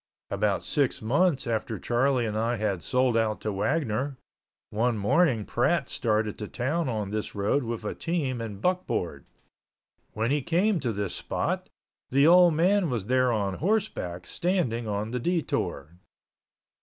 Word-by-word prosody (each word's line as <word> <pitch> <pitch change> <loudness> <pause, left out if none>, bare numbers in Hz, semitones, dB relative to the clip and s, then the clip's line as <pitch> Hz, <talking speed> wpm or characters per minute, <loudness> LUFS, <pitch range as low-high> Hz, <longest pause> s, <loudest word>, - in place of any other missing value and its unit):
About - - 0
six - - 0
months 140 +6 +2
after 115 -2 -2
Charlie 125 +1 +1
and 105 -1 -3
I 115 +2 0
had 105 -4 -1
sold 125 +2 +1
out 110 -2 +1
to 105 - -2
Wagner, 130 +4 -1 0.5
one 115 +2 +1
morning 115 - +2
Pratt - - +1
started 110 -2 -1
to 105 - -4
town 140 +7 -1
on 105 -4 -3
this 110 0 -3
road 105 +8 +1
with 115 -2 -4
a - - -2
team 145 -8 -2
and 105 -4 -6
buckboard. 105 - -1 0.9
When 110 +3 0
he 145 0 +2
came 180 +7 +2
to 125 -6 -1
this 100 -3 -3
spot, - - -2 0.4
the 140 +2 +4
old 175 0 +7
man 180 +2 +3
was 115 -6 -2
there 130 +1 +2
on 100 -4 -1
horseback, 170 - -1
standing 150 - -1
on 105 +1 -2
the 125 - -2
detour. 90 - -2
120 Hz, 155 wpm, -27 LUFS, 105-150 Hz, 0.9 s, old